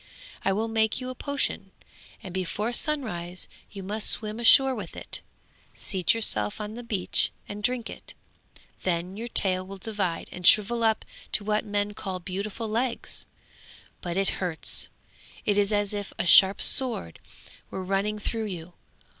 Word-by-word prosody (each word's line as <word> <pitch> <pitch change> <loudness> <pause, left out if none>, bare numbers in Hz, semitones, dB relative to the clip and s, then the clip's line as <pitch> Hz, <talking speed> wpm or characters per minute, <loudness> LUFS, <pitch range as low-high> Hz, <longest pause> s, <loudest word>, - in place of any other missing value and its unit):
I 195 - +2
will 215 +4 0
make 220 0 +2
you 255 0 -4
a - - -5
potion, 285 +2 -1 0.5
and 185 - -7
before 200 +5 -1
sunrise 215 - -1 0.2
you 195 -2 -8
must 210 +3 0
swim 215 0 0
ashore 265 +3 +7
with - - -6
it, - - -5 0.5
seat 185 0 +1
yourself 105 - 0
on 210 0 -5
the 240 - -6
beach 215 -6 0 0.2
and 205 0 -6
drink 245 +1 0
it; - - -9 0.7
then 180 +1 -1
your 230 +3 -5
tail 185 -5 +1
will 195 +1 -8
divide 190 -4 -2
and 180 -1 -1
shrivel 230 +3 +6
up 220 -1 +2 0.3
to 210 - 0
what 210 +1 0
men 205 0 -1
call 190 -3 -4
beautiful 200 +5 -4
legs. 235 +3 -1 0.7
But 175 0 -3
it 195 0 +3
hurts; 175 -3 0 0.6
it 205 - +3
is 205 0 +2
as 205 -1 +1
if 205 -1 -4
a - - -1
sharp 190 +2 +8
sword 235 - +2 0.5
were 190 - -5
running 195 +3 0
through 220 +1 -2
you. 175 -4 -6
205 Hz, 160 wpm, -27 LUFS, 185-225 Hz, 0.7 s, sharp